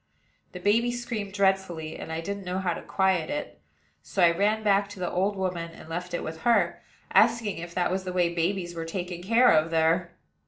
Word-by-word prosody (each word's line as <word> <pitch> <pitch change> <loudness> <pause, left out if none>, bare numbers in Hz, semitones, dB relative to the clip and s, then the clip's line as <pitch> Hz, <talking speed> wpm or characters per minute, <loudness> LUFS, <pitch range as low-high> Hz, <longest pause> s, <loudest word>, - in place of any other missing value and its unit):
The 180 - -6
baby 225 +6 +2
screamed 235 -4 -4
dreadfully, 190 -5 0
and - - -7
I 160 0 -3
didn't 200 +3 -5
know 180 0 -3
how 185 -2 0
to - - -7
quiet 190 -4 +1
it; 100 - -5 0.4
so 190 - -1
I 170 - +7
ran 210 +5 +1
back 200 -1 +3
to 205 - -10
the 180 - -2
old 195 +3 0
woman, 180 -3 -2
and - - -13
left 175 +2 -4
it - - -3
with 160 +1 -6
her, 210 -8 +2 0.3
asking 225 -6 +3
if 170 0 -8
that 180 -1 +1
was 190 0 -1
the 185 - -4
way 175 -1 +1
babies 175 +1 -1
were 165 -1 -4
taken 175 +1 -5
care 230 +6 +5
of 155 +1 +3
there. 165 +2 +1
180 Hz, 210 wpm, -27 LUFS, 170-200 Hz, 0.4 s, I